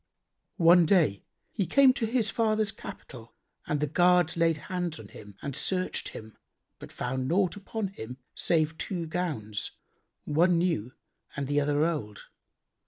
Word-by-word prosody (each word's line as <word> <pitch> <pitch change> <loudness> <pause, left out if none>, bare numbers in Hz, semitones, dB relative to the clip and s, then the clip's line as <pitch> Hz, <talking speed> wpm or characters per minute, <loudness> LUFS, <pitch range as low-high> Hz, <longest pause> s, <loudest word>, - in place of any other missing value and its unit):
One 170 -1 +6
day, 155 - +2 0.3
he 195 -6 -1
came 275 -2 +6
to 240 -4 -2
his 225 -3 +1
father's 215 -2 +1
capital 125 - -11 0.3
and 150 - 0
the 150 - +1
guards 175 +2 +3
laid 165 -1 +2
hands 175 - -4
on 105 -2 -11
him 105 -1 -13
and 140 -2 -4
searched 185 -1 -1
him 110 0 -11 0.4
but - - -10
found 130 +1 -3
naught 185 +3 +1
upon 205 0 -4
him 125 -9 -8 0.2
save 160 -1 0
two 175 -4 -3
gowns, 150 - -3 0.5
one 170 +4 +3
new 150 - 0 0.4
and 140 - -2
the 145 +2 +1
other 145 +1 +2
old. 140 -12 -3
165 Hz, 150 wpm, -28 LUFS, 140-185 Hz, 0.5 s, One